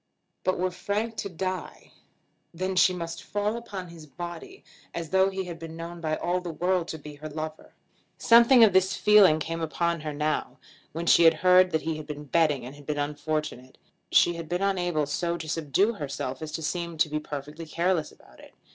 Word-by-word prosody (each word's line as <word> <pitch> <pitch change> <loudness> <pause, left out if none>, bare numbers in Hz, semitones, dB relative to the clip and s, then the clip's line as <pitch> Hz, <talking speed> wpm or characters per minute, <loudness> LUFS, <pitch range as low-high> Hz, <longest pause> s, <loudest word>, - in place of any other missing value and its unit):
But 185 - +1
were 185 +1 0
Frank 205 +5 -3
to 200 - -3
die, 185 +1 -5 0.6
then 185 +2 -2 0.2
must 170 -1 -5
she - - -12
fall 205 +2 -1
upon 200 -6 -7
his 165 -2 -12
body 175 - -8 0.3
as 165 -2 -5
though 190 0 +4
he 190 0 -3
had 170 -2 -8
been 165 0 -8
known 170 +1 -7
by 155 -1 -1
all 180 +3 -1
the 180 - -6
world 180 +1 0
to 160 - -5
be 150 0 -10
her 155 +1 -7
lover. 155 +1 -7 0.4
Something 235 +1 +7
of 210 -4 +6
this 190 +1 +3
feeling 205 -7 +6
came 165 +2 -4
upon 165 +2 -1
her 150 0 -4
now, 150 +1 -2 0.3
when 165 +2 -4
she 170 -1 +7
heard 185 +2 +4
that 160 -3 -1
he 160 -1 -2
had 155 -1 -8
been 150 -1 -6
betting 150 -3 +1
and 130 +3 -9
had 145 -1 -15
been 150 -1 -2
unfortunate. 145 -2 -3 0.3
She 175 - +5
had 165 -2 -7
been 175 +2 -1
unable 175 -6 0
so 170 +4 -2
to 160 -2 -7
subdue 165 - +1
herself 140 - -5
as 155 -1 -5
to 160 - -4
seem 170 +1 -3
to 155 - +3
be 150 0 -2
perfectly 150 +2 -7
careless 170 0 0
about 60 - -20
it. - - -16
165 Hz, 200 wpm, -27 LUFS, 155-185 Hz, 0.6 s, Something